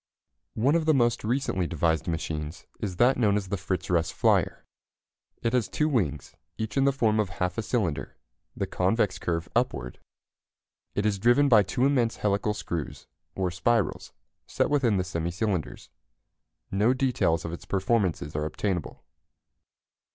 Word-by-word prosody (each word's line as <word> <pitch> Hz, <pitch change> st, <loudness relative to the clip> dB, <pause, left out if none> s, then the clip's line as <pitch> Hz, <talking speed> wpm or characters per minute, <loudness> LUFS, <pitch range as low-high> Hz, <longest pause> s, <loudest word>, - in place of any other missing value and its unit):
One 130 Hz, +7 st, +2 dB
of 165 Hz, -1 st, +2 dB
the 155 Hz, -1 st, +4 dB
most 120 Hz, -3 st, +2 dB
recently 110 Hz, -6 st, 0 dB
devised 80 Hz, -1 st, 0 dB
machines 80 Hz, 0 st, -4 dB
is 95 Hz, -4 st, -3 dB
that 125 Hz, +7 st, +4 dB
known 105 Hz, -4 st, +3 dB
as 95 Hz, -2 st, -4 dB
the 100 Hz, -, 0 dB
Fritz 95 Hz, -1 st, -3 dB
Russ 85 Hz, -2 st, +1 dB
flyer. -, -, +1 dB, 0.8 s
It 115 Hz, -, 0 dB
has 125 Hz, -4 st, +1 dB
two 150 Hz, -, +1 dB
wings, 90 Hz, -, -1 dB, 0.2 s
each 110 Hz, -1 st, -4 dB
in 135 Hz, -, +3 dB
the 140 Hz, -, +5 dB
form 110 Hz, -5 st, +1 dB
of 105 Hz, -3 st, +1 dB
half 90 Hz, +1 st, -2 dB
a -, -, -1 dB
cylinder, 110 Hz, -, -2 dB, 0.4 s
the -, -, 0 dB
convex 95 Hz, +2 st, 0 dB
curve 85 Hz, -1 st, -2 dB
upward. 90 Hz, -, -1 dB, 1.0 s
It 100 Hz, -, 0 dB
is 105 Hz, -2 st, +1 dB
driven 120 Hz, +7 st, +4 dB
by 115 Hz, -6 st, +7 dB
two 120 Hz, +6 st, 0 dB
immense 125 Hz, -5 st, +2 dB
helical 105 Hz, +1 st, 0 dB
screws, 85 Hz, -7 st, -5 dB, 0.3 s
or 95 Hz, -2 st, -1 dB
spirals, 100 Hz, +1 st, 0 dB, 0.4 s
set -, -, 0 dB
within 125 Hz, -8 st, +3 dB
the 90 Hz, -, +1 dB
semi 85 Hz, -2 st, -3 dB
cylinders. 90 Hz, -, -3 dB, 0.8 s
No 105 Hz, +6 st, +3 dB
details 125 Hz, -11 st, +1 dB
of 85 Hz, -, -4 dB
its 85 Hz, -, -8 dB
performances 95 Hz, -7 st, 0 dB
are 75 Hz, 0 st, -1 dB
obtainable. 85 Hz, +1 st, -3 dB
100 Hz, 160 wpm, -27 LUFS, 85-120 Hz, 1.0 s, by